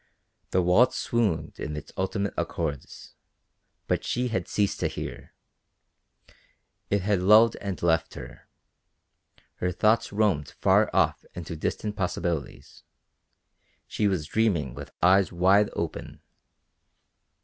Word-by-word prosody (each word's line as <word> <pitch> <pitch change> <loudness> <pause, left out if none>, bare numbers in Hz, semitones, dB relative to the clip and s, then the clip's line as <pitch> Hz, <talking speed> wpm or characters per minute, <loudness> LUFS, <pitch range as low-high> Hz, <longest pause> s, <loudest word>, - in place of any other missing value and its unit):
The 95 - +1
waltz 120 +9 +4
swooned 110 -9 -1
in 75 - -4
its 75 - -9
ultimate 100 +1 -2
accords, 75 -5 -5 0.7
but - - -1
she 125 0 -1
had 95 -6 -2
ceased 100 -2 0
to - - +1
hear; - - -8 1.5
it 100 -2 +1
had 100 -2 +1
lulled 110 +4 +6
and 100 -3 -5
left 80 -1 +1
her; - - -11 1.1
her 90 - -1
thoughts 110 +5 +2
roamed 100 -8 0
far - - +4
off - - +1
into 85 -1 -6
distant 105 +6 -3
possibilities; 85 - -4 1.0
she 105 - -1
was 90 -6 -1
dreaming 85 - 0
with - - -9
eyes 95 +2 +4
wide 95 +4 +3
open. - - -5
95 Hz, 115 wpm, -26 LUFS, 85-105 Hz, 1.5 s, lulled